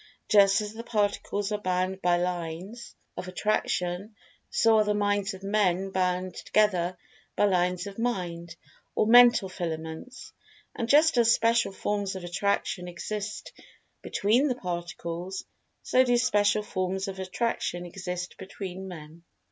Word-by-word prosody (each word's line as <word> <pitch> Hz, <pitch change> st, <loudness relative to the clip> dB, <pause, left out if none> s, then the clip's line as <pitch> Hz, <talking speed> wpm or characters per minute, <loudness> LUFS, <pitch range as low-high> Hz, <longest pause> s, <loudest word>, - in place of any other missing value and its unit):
Just 200 Hz, -1 st, +6 dB
as 210 Hz, 0 st, -5 dB
the 225 Hz, -, -7 dB
Particles 205 Hz, -2 st, -1 dB
are 210 Hz, 0 st, -2 dB
bound 185 Hz, 0 st, -1 dB
by 175 Hz, 0 st, +3 dB
lines 180 Hz, +5 st, -4 dB, 0.2 s
of -, -, -6 dB
Attraction, 185 Hz, 0 st, -1 dB, 0.3 s
so 225 Hz, -1 st, +4 dB
are -, -, +5 dB
the 210 Hz, 0 st, 0 dB
Minds 205 Hz, -1 st, 0 dB
of 190 Hz, -, -13 dB
Men 195 Hz, -2 st, +1 dB
bound 185 Hz, 0 st, 0 dB
together 185 Hz, -4 st, +1 dB, 0.4 s
by -, -, +3 dB
lines 180 Hz, -1 st, +1 dB
of 200 Hz, +1 st, -8 dB
Mind, 175 Hz, -8 st, -3 dB, 0.4 s
or -, -, +3 dB
Mental 240 Hz, -3 st, +7 dB
filaments. 165 Hz, +5 st, -6 dB, 0.4 s
And 230 Hz, -1 st, -3 dB
just 300 Hz, -2 st, +5 dB
as 230 Hz, -1 st, +5 dB
special 230 Hz, -1 st, +3 dB
forms 200 Hz, 0 st, -2 dB
of 190 Hz, -, -6 dB
Attraction 180 Hz, 0 st, -1 dB
exist 210 Hz, +4 st, -5 dB, 0.5 s
between 235 Hz, +8 st, +2 dB
the 255 Hz, -, 0 dB
Particles, 175 Hz, -1 st, -5 dB, 0.4 s
so 255 Hz, -, +4 dB
do 245 Hz, -1 st, +3 dB
special 210 Hz, -3 st, +2 dB
forms 190 Hz, 0 st, -2 dB
of 190 Hz, -1 st, -6 dB
Attraction 185 Hz, -2 st, -2 dB
exist 180 Hz, 0 st, -6 dB
between 190 Hz, -1 st, -7 dB
Men. 165 Hz, -2 st, -10 dB
195 Hz, 140 wpm, -27 LUFS, 180-215 Hz, 0.5 s, Mental